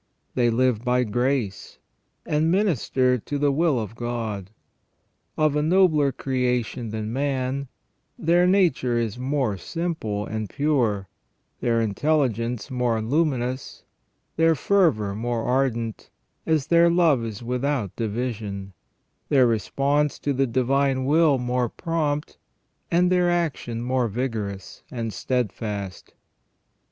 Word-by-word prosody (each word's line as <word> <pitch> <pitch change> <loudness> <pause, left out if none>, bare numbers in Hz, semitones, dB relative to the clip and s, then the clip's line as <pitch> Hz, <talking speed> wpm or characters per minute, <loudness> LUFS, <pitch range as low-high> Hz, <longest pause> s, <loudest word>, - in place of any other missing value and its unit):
They 120 -2 +2
live 120 -1 +1
by 125 0 +2
grace, 120 -2 -1 0.5
and 155 +2 +1
minister 135 - +2
to 145 +6 -4
the 145 0 +2
will 150 -2 +2
of 110 0 -5
God. 115 -5 -4 0.9
Of 155 -1 +2
a 150 - +2
nobler 155 -4 +3
creation 125 -3 -1
than 110 +1 -4
man, 135 0 -1 0.5
their 175 +2 +3
nature 170 -11 +2
is 115 0 -2
more 130 -5 0
simple 155 - -3
and 110 -2 -4
pure, 120 -10 0 0.5
their 115 -1 +1
intelligence 120 0 0
more 125 -3 0
luminous, 130 0 -1 0.5
their 165 0 +4
fervour 150 - +2
more 115 +2 -2
ardent, 125 -3 -1 0.4
as 155 -4 +2
their 170 +1 +5
love 165 -8 +3
is 110 0 -6
without 125 -3 -1
division, 105 -4 -4 0.6
their 135 -3 +5
response 140 +6 +1
to 145 - -1
the 135 +1 +1
Divine 130 +2 +1
Will 150 0 +4
more 125 -1 -1
prompt, 150 -2 -2 0.5
and 180 +1 +3
their 180 -1 +3
action 150 -9 -1
more 125 -1 +1
vigorous 105 -4 -4
and 115 -4 -4
steadfast. 105 -5 -3
125 Hz, 120 wpm, -24 LUFS, 115-150 Hz, 0.9 s, their